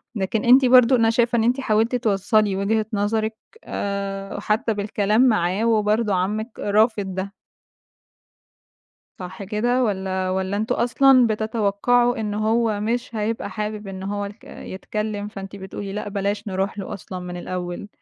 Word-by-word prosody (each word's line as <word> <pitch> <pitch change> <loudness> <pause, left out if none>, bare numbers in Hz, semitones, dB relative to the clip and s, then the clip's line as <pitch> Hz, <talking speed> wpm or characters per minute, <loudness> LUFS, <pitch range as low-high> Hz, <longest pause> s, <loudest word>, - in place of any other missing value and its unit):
لكن 210 +2 -1
أنتِ 255 +2 +7
برضه 250 0 +6
أنا 225 -2 +3
شايفة 235 +1 +2
إن 225 - +2
أنتِ 245 +4 +2
حاولتِ 225 -1 +1
توصّلي 210 -2 +1
وجهة 215 +3 0
نظرِك 215 +2 0 0.3
آآ، 200 0 -4
حتى 215 +2 0
بالكلام 205 +1 +1
معاه 195 -1 +1
وبرضه 215 -1 +2
عمِّك 215 +5 -2
رافض 205 -2 +1
ده. 195 +2 -4 1.9
صح 185 +2 -7
كده، 240 +6 0
والّا 190 -3 -1
والّا 190 +1 -1
أنتم 220 +2 -1
أصلًا 250 +1 +4
بتتوقَّعوا 220 +2 +1
إنه 210 -1 -2
هو 225 -2 +1
مش 235 +3 -2
هيبقى 220 +1 -2
حابِب 210 -1 -5
إن 190 -1 -7
هو 205 +1 -3
الك 205 +2 -11
يتكلَّم؟ 210 +2 -5
فأنتِ 195 -1 -8
بتقولي 195 0 -7
لأ، 210 0 -4
بلاش 200 +1 -2
نرُوح 195 +2 -2
له 195 - -5
أصلًا 185 0 -7
من 180 0 -6
الأوَّل. 175 +1 -5
210 Hz, 145 wpm, -22 LUFS, 195-225 Hz, 1.9 s, أنتِ